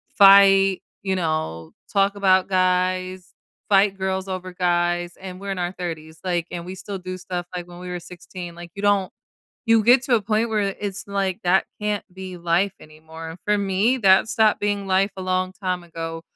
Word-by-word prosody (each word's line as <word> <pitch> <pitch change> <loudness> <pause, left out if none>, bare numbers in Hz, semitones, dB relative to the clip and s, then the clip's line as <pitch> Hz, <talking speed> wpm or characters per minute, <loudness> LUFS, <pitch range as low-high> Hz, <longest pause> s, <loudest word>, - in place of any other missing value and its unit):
fight, 195 -1 +7 0.2
you 190 -1 0
know, 155 - -2 0.2
talk 200 0 +2
about 190 -2 +3
guys, 185 0 0 0.4
fight 195 -1 +4
girls 190 0 -2
over 185 -1 -5
guys, 175 -1 0
and 185 -1 -9
we're 200 0 -5
in 190 - -3
our 175 0 -1
30s, 160 -3 -7
like, 175 -2 0
and 170 -1 -5
we 185 - -7
still 195 +1 -6
do 185 0 -6
stuff, 175 -1 -5
like, 175 -1 -4
when 175 0 -12
we 180 0 -7
were 180 0 -4
16, 175 0 -9
like, 175 -1 -10
you 200 - -6
don't 200 -2 +2 0.6
you 225 -1 +5
get 245 +3 +6
to 260 - 0
a 220 - +1
point 215 +2 0
where 215 -1 0
i 195 - -7
it's 200 -2 -4
like, 195 -2 -1
that 185 +2 +3 0.2
can't 210 -1 -1
be 185 -1 -8
life 175 +3 +1
anymore, 160 +1 -10
for 210 0 +2
me, 200 +6 +1
that 195 -2 +5
stopped 220 -2 +3
being 205 -1 -1
life 190 +2 +2
a - - -5
long 185 0 0
time 185 -3 -3
ago. 165 -1 -6
185 Hz, 195 wpm, -23 LUFS, 175-200 Hz, 0.6 s, fight